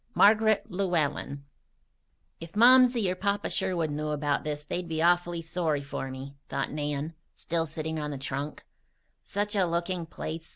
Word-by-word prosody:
MARGARET 215 0 +5
LLEWELLEN 160 -6 -1 1.0
"If 165 0 -9
Momsey 245 -1 +6
or - - +1
Papa 200 +2 -1
Sherwood 170 -4 0
knew 150 +1 -2
about 145 -1 0
this 150 -1 -3
they'd 175 +3 -3
be 160 -1 -2
awfully 175 0 +2
sorry 160 -3 -1
for 135 -1 -4
me," 135 +1 -8
thought 135 - -2
Nan, 150 +1 -3 0.2
still 165 -1 -1
sitting 160 +1 -4
on 150 -1 -3
the 145 - -4
trunk. 140 +2 -4 0.6
"Such 205 +1 -2
a 195 - +4
looking 170 0 -2
place! 160 0 -6
165 Hz, 155 wpm, -28 LUFS, 150-180 Hz, 1.0 s, Momsey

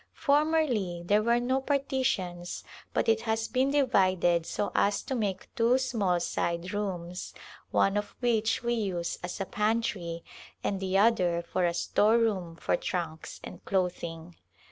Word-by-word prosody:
Formerly 280 - +1
there 205 +4 +4
were 235 +2 +3
no 260 +2 0
partitions 260 -11 -1 0.3
but - - 0
it 225 0 +3
has 225 -1 -1
been 260 +2 +1
divided 185 - +3
so 205 - -2
as 200 0 +2
to - - -4
make 205 -6 -3
two 235 +2 +3
small 215 -9 +1
side 170 +2 -2
rooms 180 -4 -4 0.3
one 195 - +2
of 205 0 -2
which 225 -2 +1
we 240 0 +1
use 190 -7 -2
as 180 +2 -5
a 195 - -1
pantry 210 -6 -1 0.4
and 195 - -1
the 190 0 0
other 185 -6 +3
for 180 +1 0
a 170 - 0
store 215 +5 +3
room 190 -8 0
for - - 0
trunks 170 -3 -4
and - - -9
clothing. 175 -3 -2
205 Hz, 150 wpm, -29 LUFS, 175-235 Hz, 0.4 s, there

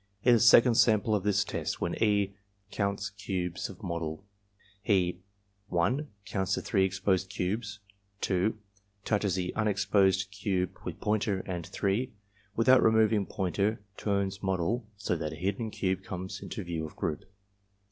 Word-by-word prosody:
In 125 - +6
the 115 - +5
second 120 +1 +7
sample 110 -2 +4
of 105 - +2
this 100 0 +2
test, - - -3
when - - -1
E. 100 -2 +2 0.4
counts 100 -1 -1
cubes 95 -3 -3
of 95 +2 -12
model 85 0 -4 0.6
he 90 -4 +1 0.5
(1) 120 - +1 0.2
counts 95 -2 0
the - - -3
three 95 -3 +2
exposed 95 0 0
cubes; 105 +3 -3 0.4
(2) 95 +4 +1 0.5
touches 100 -4 +1
the 90 -1 -2
unexposed 100 -2 +2
cube 95 -2 -1
with - - -6
pointer; 105 -2 0
and 90 -3 -5
(3) 110 +6 -1 0.4
without 130 +3 +6
removing 110 -2 +4
pointer 100 +2 0 0.2
turns 100 -1 -1
model, 95 +5 -1
so 95 -3 -1
that 80 -2 -3
hidden 100 +7 -2
cube 95 -3 -1
comes 95 +1 -6
into 105 - -5
view 85 -2 -3
of 80 - -7
group. 75 - -3
100 Hz, 145 wpm, -30 LUFS, 95-105 Hz, 0.6 s, second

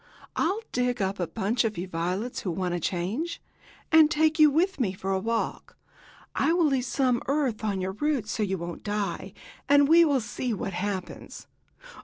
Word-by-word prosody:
I'll 385 +7 0
dig 250 0 0
up 195 0 -1
a 175 - -1
bunch 225 +5 0
of 220 -2 -2
you 180 +2 -4
violets, 185 +7 -3
who 190 - -4
want 180 +1 -2
a 175 - -1
change, 200 - -2 0.5
and 320 -2 +7
take 315 0 +2
you 305 -1 +8
with 345 +4 +1
me 205 -7 0
for 190 +1 -4
a 190 - +1
walk. 230 +3 -3 0.6
I 325 - +2
will 345 -1 +3
leave 270 -4 +1
some 255 -4 +1
earth 270 -6 0
on 200 -3 -1
your 185 +1 -2
roots 255 0 -1
so - - -2
you 190 -2 0
won't 170 0 -6
die, 205 -3 -3 0.4
and 285 0 +6
we 330 +3 +7
shall 290 -5 +4
see 235 +1 -3
what 195 - -4
happens." 190 +1 -5
225 Hz, 190 wpm, -27 LUFS, 190-285 Hz, 0.6 s, you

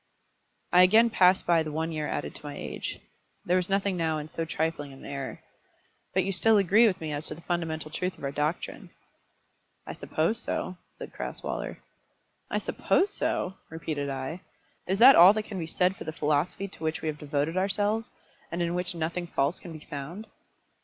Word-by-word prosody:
I 180 - +8
again 220 +6 +6
passed 185 -2 +4
by 170 -2 +4
the 155 -1 -4
one 160 +2 -2
year 155 -2 -2
added - - -3
to - - -11
my 145 - -6
age. - - -5 0.5
There 180 - +2
was 180 0 -1
nothing 195 -1 +1
now 160 -2 0
in 150 0 -6
so 165 +1 -3
trifling 160 -3 -2
an 135 - -12
error. 140 -1 -6 0.7
"But 190 - +2
you 195 - -1
still 220 +4 +4
agree 205 +4 +5
with 190 -3 0
me 155 -2 -4
as 145 +1 -1
to - - -3
the 165 - -13
fundamental 160 -3 -3
truth 180 +3 -3
of - - -14
our 140 - -1
doctrine." 150 +4 -3 1.0
"I - - -6
suppose 170 +9 -1
so," 185 -4 -3 0.2
said - - -9
Crasweller. - - -5 0.7
"I - - 0
suppose 395 +2 +1
so!" 190 - -1
repeated 155 -3 -3
I. 135 +6 -4 0.5
"Is 190 - +1
that 255 +5 +9
all 180 +4 +9
that 215 0 -2
can 200 -3 -6
be 165 - -4
said 180 +3 +1
for - - -8
the 155 - -4
philosophy 155 +5 0
to 180 - -12
which 155 0 -2
we - - -1
have 150 -1 -3
devoted 150 +2 -1
ourselves, 205 +3 +1 0.4
and 170 - -3
in 170 0 -1
which 180 0 -2
nothing 170 +2 -2
false 145 0 0
can 175 - -10
be 155 -1 -10
found?" 150 +9 -6
170 Hz, 195 wpm, -28 LUFS, 155-190 Hz, 1.0 s, that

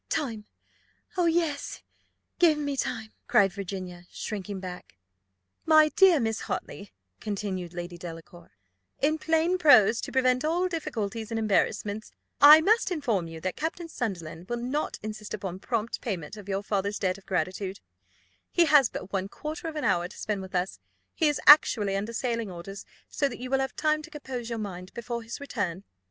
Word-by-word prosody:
"Time! 225 -7 -2 0.7
O 355 -2 +2
yes, 325 -4 -1 0.6
give 330 -4 +5
me 285 -1 -2
time," 225 -4 -3
cried 195 -3 +4
Virginia, 185 -3 -6
shrinking 200 -2 -5
back. 180 - -9 0.7
"My 310 -1 +6
dear 380 -3 +5
Miss 225 -2 -1
Hartley," 200 -1 -5 0.3
continued 190 -4 -4
Lady 175 0 -6
Delacour, 170 0 -10 0.5
"in 310 +3 +1
plain 325 +3 +1
prose, 235 - +6
to - - -6
prevent 255 0 +2
all 340 +4 +1
difficulties 225 - -4
and 225 - -1
embarrassments, 215 0 0 0.3
I 300 +2 +10
must 430 +5 +3
inform 235 - -1
you, 165 0 -8
that 185 +1 -2
Captain 330 +2 -3
Sunderland 175 - -5
will 240 - -1
not 255 +6 -2
insist 215 -1 -5
upon 185 -1 -6
prompt 230 +1 -2
payment 185 -6 -4
of 205 -2 -11
your 195 +1 -1
father's 200 0 -1
debt 185 -1 -1
of 195 - -25
gratitude: 185 +2 -2 0.7
he 345 - +4
has 290 -5 +6
but 190 - -8
one 195 0 -1
quarter 310 +6 -6
of 320 - -5
an 300 - -3
hour 175 0 +2
to - - -14
spend 210 -3 -2
with 190 0 -8
us 180 +1 -1 0.3
he 320 - +2
is 295 - -1
actually 210 -9 +7
under 205 +3 -2
sailing 230 -3 -2
orders; 185 +3 -8 0.2
so 280 - 0
that - - -7
you 255 +1 -7
will 270 - +3
have 265 0 -2
time 310 -1 +1
to - - -11
compose 260 -5 -6
your 230 - -3
mind 185 -4 -6
before 235 0 -4
his 230 +1 -7
return. 200 -10 -3
220 Hz, 175 wpm, -27 LUFS, 190-290 Hz, 0.7 s, I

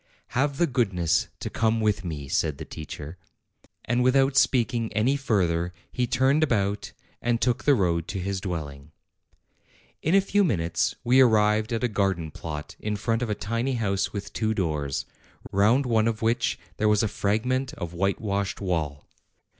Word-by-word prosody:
"Have 140 +2 0
the 175 - +4
goodness 100 - +1
to - - -3
come 115 0 +1
with 105 -2 +1
me," 75 -5 -5
said 75 +1 0
the - - -7
teacher. 80 +2 -8 0.7
And 120 +2 +1
without 135 +2 +3
speaking 120 -4 +2
any 120 +6 +2
further 90 -10 0 0.2
he 125 -1 -1
turned 135 +5 +3
about 105 -8 0 0.3
and 120 -1 +1
took 125 -1 0
the 145 - +6
road 85 -6 0
to 95 - -4
his 95 +1 -3
dwelling. 75 -6 -6 1.1
In 165 +5 +2
a - - +8
few 200 +1 +2
minutes 85 - 0
we 130 +2 +5
arrived 110 -2 +3
at 115 +1 -1
a - - +4
garden 95 -7 -1
plot 75 -1 -7
in 105 0 -2
front 115 +3 -1
of 120 - -2
a 105 - 0
tiny 115 +6 -2
house 100 -5 0
with 100 -2 -6
two 110 -1 0
doors, 75 -8 -1 0.5
round 110 +8 +3
one 115 -2 +2
of 115 0 -2
which 115 +2 +1 0.2
there 110 - +2
was 105 0 +3
a - - +2
fragment 125 +7 0
of 85 - -6
whitewashed 100 +2 -1
wall. 80 -7 -2
105 Hz, 170 wpm, -26 LUFS, 90-120 Hz, 1.1 s, a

